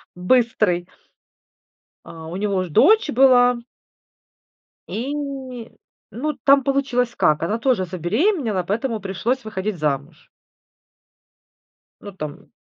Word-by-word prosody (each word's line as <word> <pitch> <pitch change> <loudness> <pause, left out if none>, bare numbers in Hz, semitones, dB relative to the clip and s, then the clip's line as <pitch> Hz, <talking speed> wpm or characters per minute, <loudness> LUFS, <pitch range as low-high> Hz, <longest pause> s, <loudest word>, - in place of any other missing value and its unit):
быстрый. 180 -3 +1 1.2
А 160 -1 -10
у 170 - -7
него 200 -1 -1
уже 185 -1 -2
дочь 360 - +4
была. 250 -2 +5 1.3
И, 255 +6 -3 1.0
ну, 295 +8 -3
там 275 -1 +5
получилось 250 -3 0
как: 150 +1 +2
она 205 +7 -1
тоже 235 -6 +1
забеременела, 210 - 0
поэтому 220 +4 -2
пришлось 210 +7 -2
выходить 210 -2 -4
замуж. 150 +1 -3 1.7
Ну, 205 - -9
там 155 -6 -8
215 Hz, 100 wpm, -21 LUFS, 180-255 Hz, 1.7 s, была